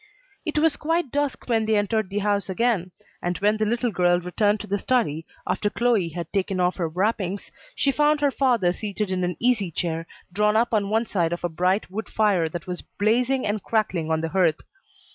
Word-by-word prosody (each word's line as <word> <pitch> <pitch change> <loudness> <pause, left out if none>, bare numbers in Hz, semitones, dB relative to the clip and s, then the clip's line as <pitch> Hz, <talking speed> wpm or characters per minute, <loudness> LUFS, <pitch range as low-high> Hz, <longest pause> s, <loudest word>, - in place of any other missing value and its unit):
It 310 - -1
was 310 -1 +3
quite 325 -3 -1
dusk 290 -1 -1
when 225 -3 +2
they 220 0 +2
entered 205 -1 0
the 200 - -4
house 200 -2 +1
again, 195 -2 +1 0.3
and 175 0 -1
when 210 +2 +2
the 215 0 0
little 235 +1 0
girl 175 -2 +3
returned 205 +4 +1
to - - -6
the 200 0 -1
study, 185 - 0 0.2
after 205 - 0
Chloe 230 -7 +1
had 170 0 -7
taken 195 -1 0
off 180 0 +1
her 170 -3 -1
wrappings, 195 +2 -1 0.2
she 275 - +2
found 295 +2 +3
her 290 -1 +2
father 240 -11 +2
seated 210 0 -3
in 185 -1 0
an 180 -1 -2
easy 230 -6 +2
chair, 165 0 -3 0.3
drawn 210 +2 +2
up 235 +2 +2
on 205 -2 +1
one 225 +2 +1
side 175 -6 0
of 175 - -5
a 175 - 0
bright 180 +4 0
wood 220 +3 -5
fire 195 -7 +2
that 170 +3 -6
was 180 -1 -4
blazing 245 +5 0
and 210 0 -1
crackling 190 -8 -1
on 160 0 +1
the 165 - -2
hearth. 170 -3 +2
205 Hz, 210 wpm, -24 LUFS, 180-230 Hz, 0.3 s, was